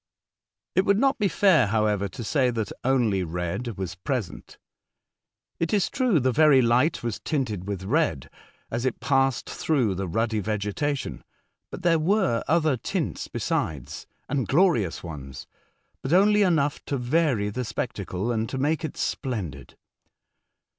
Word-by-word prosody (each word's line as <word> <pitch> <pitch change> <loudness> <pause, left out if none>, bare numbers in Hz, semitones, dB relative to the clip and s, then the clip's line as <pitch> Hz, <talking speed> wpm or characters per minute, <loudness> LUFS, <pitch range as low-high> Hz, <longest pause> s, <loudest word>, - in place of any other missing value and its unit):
It 185 - +3
would 200 0 +3
not 270 +3 +2
be 205 - +3
fair, 165 - +4
however, 105 -1 +1
to 115 - -8
say 130 +2 +2
that 110 -4 -3
only 120 -7 +2
red 90 +7 -4
was 95 -2 -4
present. 105 +2 -5 1.0
It 165 +5 +1
is 200 - +1
true, 250 - +2
the 130 0 +2
very 150 0 +5
light 125 +6 +2
was 115 -3 -3
tinted 110 - -2
with 100 -2 -4
red 110 - 0 0.4
as 115 +1 -2
it 130 -2 -1
passed 135 -3 +1
through 130 -10 0
the 95 +1 -3
ruddy 110 +4 0
vegetation; 105 +8 -2 0.5
but 180 - -8
there 165 -2 +4
were 180 - +2
other 155 -2 +2
tints - - -3
besides, 70 -3 -3 0.2
and 135 -5 -1
glorious 135 - +2
ones, 70 -6 -8 0.6
but 135 - -2
only 210 +3 +5
enough 155 -7 +1
to 140 - -2
vary 125 -5 +1
the 125 +4 -3
spectacle 105 -3 -3
and 110 -1 -1
to 135 - -4
make 150 +4 0
it 155 - -5
splendid. 100 - -4
125 Hz, 145 wpm, -25 LUFS, 100-155 Hz, 1.0 s, very